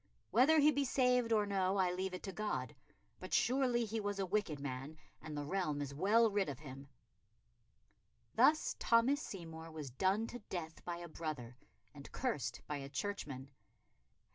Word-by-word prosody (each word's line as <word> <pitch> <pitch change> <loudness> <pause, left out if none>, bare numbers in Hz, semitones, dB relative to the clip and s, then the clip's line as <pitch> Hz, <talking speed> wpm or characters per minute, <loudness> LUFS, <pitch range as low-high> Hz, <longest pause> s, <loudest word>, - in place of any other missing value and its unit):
Whether 285 +7 +6
he 300 0 +6
be 285 0 +1
saved 250 -3 +2
or 215 -2 +4
no, 195 -1 +1
I 185 -2 +3
leave 185 +1 -2
it - - -8
to 195 - -4
God. 215 +2 -3 0.4
But - - -2
surely 250 -2 +2
he 220 +1 -2
was 205 -1 -2
a 195 - 0
wicked 185 -6 -1
man, 140 +2 -5 0.2
and 150 -1 -6
the 145 - -3
realm 155 -3 -1
is 140 -1 -4
well 215 +9 +4
rid 200 -4 +1
of 140 - -5
him." 135 -1 -10 1.5
Thus 290 +7 +4
Thomas 240 +5 +4
Seymour 165 - -7
was 155 -4 -7
done 190 - +1
to 245 +1 -7
death 160 -3 -5
by 175 -1 -3
a 175 0 -7
brother, 155 -7 -5 0.4
and 140 -1 -11
cursed 240 - -2
by 150 - -3
a 135 -1 -7
churchman. 140 -7 -4
190 Hz, 170 wpm, -36 LUFS, 150-230 Hz, 1.5 s, Whether